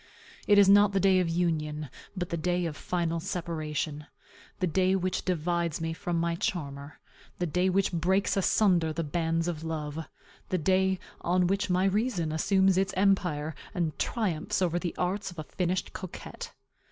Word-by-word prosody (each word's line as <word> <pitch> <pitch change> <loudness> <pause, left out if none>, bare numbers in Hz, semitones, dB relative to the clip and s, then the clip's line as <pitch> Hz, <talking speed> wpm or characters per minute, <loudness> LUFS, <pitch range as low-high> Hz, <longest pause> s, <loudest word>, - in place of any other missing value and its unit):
It 205 - +6
is 200 -1 +7
not 200 0 +6
the 195 - +2
day 190 0 +4
of 180 -2 +1
union, 155 -3 -1 0.3
but 180 -1 -2
the - - -1
day 175 +1 0
of 160 -3 -3
final 170 -1 -1
separation; 155 -4 -3 0.5
the 185 - +2
day 185 +2 +2
which 185 -1 -1
divides 170 -2 -1
me 165 0 -2
from 170 +1 -2
my 170 0 0
charmer; 145 -4 -4 0.4
the 175 - -1
day 180 +3 +1
which 190 0 +1
breaks 185 +4 +1
asunder 185 -4 +3
the 165 +2 -2
bands 165 +2 0
of 165 -2 -3
love; 160 -1 -4 0.4
the 185 - +1
day 190 +2 +2 0.2
on 180 +1 +2
which 195 +2 0
my 180 +1 +2
reason 195 -5 0
assumes 190 +4 +3
its 195 +1 -1
empire, 180 -6 +1 0.2
and 165 -4 -1
triumphs 190 -10 -1
over 175 -2 +1
the 175 -2 -4
arts 195 +2 -1
of 175 - -12
a 155 - -4
finished 180 +3 -2
coquette. 185 - -7
175 Hz, 170 wpm, -29 LUFS, 160-190 Hz, 0.5 s, is